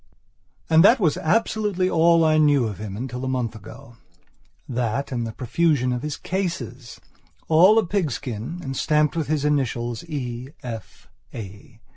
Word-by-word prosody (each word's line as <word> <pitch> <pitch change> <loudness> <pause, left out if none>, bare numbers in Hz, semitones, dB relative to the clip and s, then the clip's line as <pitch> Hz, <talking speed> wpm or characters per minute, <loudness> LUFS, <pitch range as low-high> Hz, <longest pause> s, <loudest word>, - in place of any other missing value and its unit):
And 160 +1 +5
that 235 +6 +6
was 165 -8 +2
absolutely 205 0 0
all 170 -1 +4
that - - +4
I 155 0 +3
knew 145 -4 +4
of 105 -4 -5
him 105 -2 -6
until 125 +1 -5
a - - -2
month 125 -3 -1
agothat 115 - -7
and 120 -3 -2
the - - -5
profusion 130 +2 +1
of 125 - -3
his 150 0 -4
cases, 140 - -4 0.5
all 180 +7 +6
of 220 -5 +3
pigskin 140 - -3
and 135 -1 -5
stamped 150 +2 +1
with 160 -3 -1
his 150 -1 0
initials, 120 -4 -1
E. 130 -5 -5
F. 115 -3 -8 0.3
A. 105 +2 -10
135 Hz, 155 wpm, -23 LUFS, 120-160 Hz, 0.5 s, that